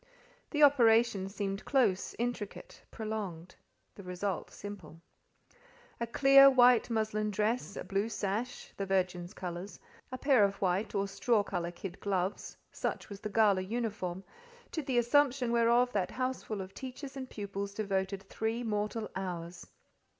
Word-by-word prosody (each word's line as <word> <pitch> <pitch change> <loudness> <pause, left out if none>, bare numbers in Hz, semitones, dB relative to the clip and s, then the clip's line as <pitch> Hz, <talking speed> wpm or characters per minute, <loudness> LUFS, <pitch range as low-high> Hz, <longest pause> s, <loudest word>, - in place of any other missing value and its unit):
The 300 -1 +2
operation 230 -7 +5
seemed 195 0 -3
close, 240 -9 +1
intricate, 240 -3 -4
prolonged: 205 -6 -5 0.4
the - - -11
result 180 0 -3
simple. 185 -6 -9 1.0
A 235 - -2
clear 275 +3 +7
white 250 -3 +5
muslin 215 -2 0
dress, 210 +2 -1
a - - -5
blue 200 +3 -1
sash 215 +3 -3
(the 195 - -3
Virgin's 185 -1 -1
colours), 180 +2 -6 0.3
a 255 - -4
pair 260 -4 +4
of 200 0 +2
white, 195 +2 -1
or 200 0 +1
straw 215 +2 +1
colour 175 -4 -3
kid 180 +1 -8
gloves—such 190 -1 -3
was 200 -1 -8
the 215 - -5
gala 205 -3 +4
uniform, 195 -3 -3 0.5
to 320 - -2
the 265 -3 -1
assumption 250 0 +3
whereof 235 +1 +3
that 195 -3 0
houseful 255 -5 -3
of 190 0 -8
teachers 265 +1 -8
and 260 -1 -6
pupils 200 -1 -5
devoted 195 -2 -2
three 225 +4 -3
mortal 215 0 -2
hours. 175 -2 -5
210 Hz, 140 wpm, -32 LUFS, 195-240 Hz, 1.0 s, clear